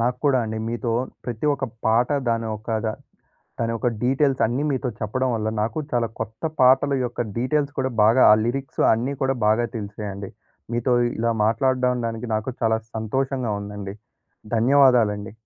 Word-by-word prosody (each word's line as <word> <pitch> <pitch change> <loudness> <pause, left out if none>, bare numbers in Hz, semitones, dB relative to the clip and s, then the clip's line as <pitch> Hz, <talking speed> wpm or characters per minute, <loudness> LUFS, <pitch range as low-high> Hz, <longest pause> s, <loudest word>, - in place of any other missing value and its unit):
నాకు 125 +1 0
కూడా 140 -3 +4
అండి. 110 0 -4
మీతో 120 0 -2 0.3
ప్రతి 120 +3 -3
ఒక్క 135 -1 -3 0.2
పాట, 115 +2 +3 0.2
దాని 115 -1 -1
ఒక 110 +1 -3
ద - - +1 0.7
దాని 115 0 0
యొక్క 120 +2 0
డీటెయిల్స్ 135 0 +2
అన్నీ 120 +6 0
మీతో 130 -2 -1
చెప్పడం 130 +5 -1
వల్ల 110 -1 -1
నాకు 110 +6 -2
చాలా 120 -2 0
కొత్త 110 +2 -6 0.2
పాఠల 135 +2 +5
యొక్క 120 0 -4 0.2
డీటెయిల్స్ 145 +3 0
కూడా 130 0 0
బాగా 115 +5 +5
ఆ - - +9
లిరిక్సు 135 +3 -2
అన్నీ 120 +5 0
కూడా 135 0 +1
బాగా 110 +3 +3
తెలిసాయండి. 100 -2 -6 0.4
మీతో 120 +2 0 0.3
ఇలా 115 +1 +1
మాట్లాడడండానికి 125 0 0
నాకు 110 +4 -2
చాలా 110 0 +2 0.2
సంతోషంగా 125 +2 -1
ఉందండి. 100 -1 -7 0.6
ధన్యవాదాలండి. 120 -5 +3
120 Hz, 150 wpm, -23 LUFS, 110-130 Hz, 0.7 s, ఆ